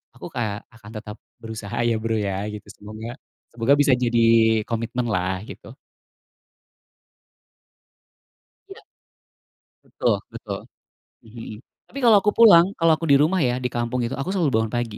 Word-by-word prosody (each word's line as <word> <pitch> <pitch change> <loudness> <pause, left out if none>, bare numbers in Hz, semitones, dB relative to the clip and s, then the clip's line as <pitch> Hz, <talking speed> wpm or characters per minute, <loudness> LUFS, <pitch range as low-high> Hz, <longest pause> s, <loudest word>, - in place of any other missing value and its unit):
aku - - -9
kayak 110 -4 -4
akan 110 -2 -15
tetap 105 -1 -9 0.3
berusaha 110 0 -7
ya 115 - +1
Bro 115 -1 -1
ya, 100 0 -3
gitu 105 - -10
semoga 110 +4 -9 0.4
semoga 120 +4 +2
bisa 140 -2 +4
jadi 115 -2 +3
komitmen 115 +1 -3
lah, 95 -2 -1
gitu. - - -11 3.0
Iya. - - -12 1.0
Betul - - 0 0.2
betul - - -6 0.7
mhm. 110 -1 -10 0.3
Tapi, 275 - -7
kalo 210 -4 +6
aku 210 - +2
pulang, 200 -5 +6
kalo 165 -1 +4
aku 160 0 -3
dirumah 155 +6 +4
ya, 125 -3 +1
di 125 - -6
kampung 120 0 -2
itu - - -4
aku 135 +6 -4
selalu 175 -8 0
bangun 110 - -3
pagi 115 -3 -4
120 Hz, 140 wpm, -22 LUFS, 110-140 Hz, 3.0 s, kalo